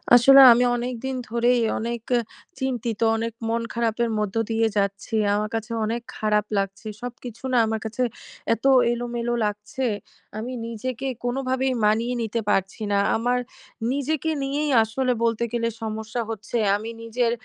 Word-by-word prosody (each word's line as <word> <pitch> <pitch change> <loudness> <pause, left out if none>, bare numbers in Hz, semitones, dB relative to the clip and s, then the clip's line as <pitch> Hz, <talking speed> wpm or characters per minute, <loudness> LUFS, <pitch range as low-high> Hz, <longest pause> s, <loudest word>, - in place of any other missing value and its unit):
আসলে 270 +3 +8
আমি 240 +1 +5
অনেকদিন 250 +2 -3
ধরেই 235 +1 +2 0.2
অনেক 235 +1 -3 0.2
অ - - +3 0.4
চিন্তিত, 240 -4 -2 0.2
অনেক 230 0 -3 0.2
মন 230 +1 0
খারাপের 235 0 0
মধ্য 210 -1 -2 0.2
দিয়ে 225 0 +2
যাচ্ছি। 200 +2 -1 0.2
আমার 210 +1 -1
কাছে 225 0 -4
অনেক 230 +2 -2 0.2
খারাপ 210 -1 +1
লাগছে। 195 +2 -3
সবকিছু 245 -1 -8
না - - +4
আমার 220 0 -1
কাছে 225 +3 -1 0.5
এত 230 - -6 0.3
এলোমেলো 240 0 -2
লাগছে, 210 +5 -3 0.5
আমি 230 +4 -4 0.2
নিজেকে 235 +3 -4 0.2
কোনভাবেই 260 +1 0
মানিয়ে 225 +3 +2
নিতে 230 0 -1
পারছি 195 +2 0
না। 200 - +3 0.2
আমার 245 +2 +1 0.5
নিজেকে 295 +3 -1
নিয়েই 290 +2 -1
আসলে 250 +4 -1
বলতে 230 0 +1
গেলে 230 -1 0 0.2
সমস্যা 220 +2 -3
হচ্ছে। 220 +1 -4 0.2
আমি 215 +2 -4
নিজের 230 +1 0
235 Hz, 145 wpm, -24 LUFS, 220-245 Hz, 0.5 s, আসলে